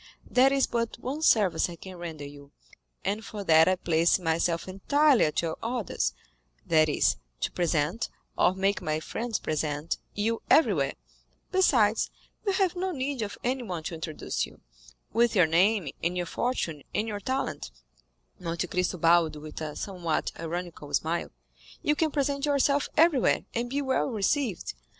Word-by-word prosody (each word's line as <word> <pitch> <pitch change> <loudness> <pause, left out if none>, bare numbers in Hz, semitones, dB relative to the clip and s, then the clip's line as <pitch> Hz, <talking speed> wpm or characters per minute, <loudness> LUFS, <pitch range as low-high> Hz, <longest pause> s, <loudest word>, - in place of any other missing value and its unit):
There 260 +2 +4
is 275 -1 +3
but 230 -1 -2
one 265 +6 -4
service 210 - +3
I 170 - -7
can 185 +2 -10
render 160 -4 -6
you, 140 0 -12 0.5
and 210 +3 -1
for 210 -2 -6
that 160 -3 +6
I 185 - +4
place 170 -1 +3
myself 170 -1 0
entirely 275 +9 +3
at 155 +2 0
your 160 -1 -2
orders, 230 -4 -1 0.5
that 155 -1 +4
is, 75 - +2 0.2
to - - 0
present, 170 +4 0 0.3
or 185 - +3
make 195 +1 +1
my 155 0 -1
friends 225 +7 -3
present, 155 0 -2 0.2
you 225 +2 0
everywhere; 185 - +4 0.6
besides, 230 - +3 0.4
you 395 - +3
have 380 -2 +1
no 370 +1 -1
need 275 -4 -2
of 205 -1 -4
anyone 240 -10 -2
to 170 - -4
introduce 160 -1 -3
you—with - - -3
your 180 -4 +6
name, 180 +1 +3
and 175 +2 0
your 175 - -1
fortune, 170 - -2
and 215 - 0
your 205 -2 -3
talent" 260 - -3 0.7
(Monte 170 -1 -2
Cristo 180 +1 -1
bowed 165 -1 +4
with 150 +1 -8
a 155 -1 -4
somewhat 175 -5 -2
ironical 165 -3 -5
smile) 165 +2 -1 0.5
"you 295 - +3
can 320 +1 +1
present 280 -1 -1
yourself 285 0 +2
everywhere, 310 -5 +4
and 240 +1 -2
be 280 +3 -1
well 265 -1 +1
received. 225 - -1
185 Hz, 155 wpm, -28 LUFS, 160-250 Hz, 0.7 s, that